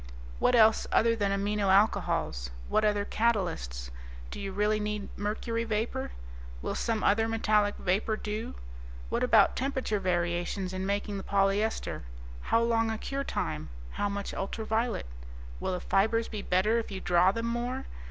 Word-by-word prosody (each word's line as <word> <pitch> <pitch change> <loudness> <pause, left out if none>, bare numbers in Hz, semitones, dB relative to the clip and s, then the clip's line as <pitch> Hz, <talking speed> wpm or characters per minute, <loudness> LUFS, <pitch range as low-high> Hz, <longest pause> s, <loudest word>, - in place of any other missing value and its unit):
"What 250 - +4
else 220 -1 +5
other 230 0 +4
than 205 -3 0
amino 200 0 0
alcohols? 190 - +2 0.2
What 215 - +2
other 205 -1 +2
catalysts? - - -1 0.4
Do - - -6
you 195 -1 -4
really 210 +2 +1
need 210 -1 -3
mercury 225 +3 -2
vapor? 220 - -2 0.5
Will - - -2
some 225 -2 -1
other 225 +2 +3
metallic 215 -2 +2
vapor 205 +4 0
do? 215 +3 -4 0.5
What - - -1
about - - +5
temperature 260 -5 -1
variations 175 +1 -1
in 185 0 -3
making 200 0 -1
the 195 - -5
polyester? 200 +2 0 0.4
How 230 - +2
long 230 -1 +2
a 220 - -2
cure 275 +5 -3
time? 75 - -3 0.2
How 205 - -1
much 200 0 -4
ultraviolet? 220 +3 -1 0.5
Will - - -2
the 180 - -2
fibers 220 +6 +2
be 215 -2 -5
better 200 +5 +2
if 230 - -5
you 195 -2 -5
draw 180 0 +4
them 230 +3 -3
more? 240 +3 -2
210 Hz, 155 wpm, -29 LUFS, 195-225 Hz, 0.5 s, else